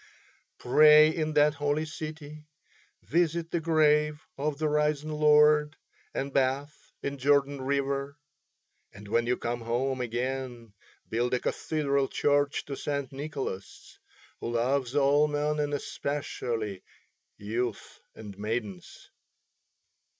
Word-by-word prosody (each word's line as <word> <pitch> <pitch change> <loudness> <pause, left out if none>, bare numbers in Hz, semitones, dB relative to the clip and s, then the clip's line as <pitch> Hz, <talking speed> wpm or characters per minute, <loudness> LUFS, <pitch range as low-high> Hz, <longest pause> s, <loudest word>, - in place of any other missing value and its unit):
Pray 150 +4 +6
in 155 -1 -1
that 150 0 +4
holy 145 +1 -1
city, 155 -1 -8 0.6
visit 170 -1 0
the 170 - 0
grave 150 -2 +2
of 145 +1 -2
the 155 0 0
risen 150 0 0
Lord 150 0 +4 0.4
and 135 0 -3
bathe 135 +2 +1 0.3
in 140 0 -4
Jordan 140 0 +2
river. 140 +1 -1 0.7
And 100 +1 -13
when 115 +2 +1
you 125 - +1
come 120 0 -3
home 125 +3 -1
again 120 -1 -4 0.3
build 120 +2 0
a - - 0
cathedral 140 -2 -1
church 145 +1 +1
to 140 - -5
St. 140 -1 -3
Nicholas, 135 -8 -6 0.4
who - - -4
loves 130 +2 0
all 145 +1 +4
men 150 0 -1
and 145 -1 -1
especially 120 -8 -3 0.6
youths 115 +3 -4 0.2
and 105 -3 -9
maidens." 105 -4 -5
140 Hz, 115 wpm, -28 LUFS, 125-150 Hz, 0.7 s, Pray